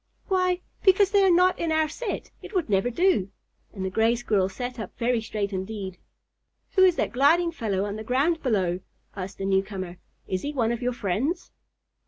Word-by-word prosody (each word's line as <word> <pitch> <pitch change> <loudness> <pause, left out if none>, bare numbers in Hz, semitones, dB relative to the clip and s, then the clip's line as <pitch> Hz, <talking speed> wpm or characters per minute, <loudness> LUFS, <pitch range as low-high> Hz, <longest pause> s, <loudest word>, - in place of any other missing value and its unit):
Why? 365 -1 +2 0.2
Because 390 0 +5
they 400 -1 +5
are 385 - +5
not 365 +1 +4
in 335 -1 0
our 315 0 +3
set. 410 +7 -5
It - - -10
would 335 - 0
never 195 +4 +2
do." 325 - +2 0.4
And 190 -2 -5
the 190 - -2
Gray 225 +4 +3
Squirrel 210 -5 +1
sat 245 +5 -5
up 215 - -7
very 240 0 +1
straight 210 -2 -3
indeed. 190 -1 -5 0.7
"Who 375 - +4
is 365 -2 +6
that - - -1
gliding 330 +7 +4
fellow 205 - -1
on 205 +1 -4
the 220 - -6
ground 280 +8 +1
below?" 185 -8 +1 0.4
asked 195 -1 -6
the 195 - -4
newcomer. 190 -2 -1 0.3
"Is 185 -1 -2
he 290 - -4
one 235 -5 +1
of 235 0 -3
your 250 0 0
friends?" 235 - -2
235 Hz, 195 wpm, -26 LUFS, -, 0.7 s, is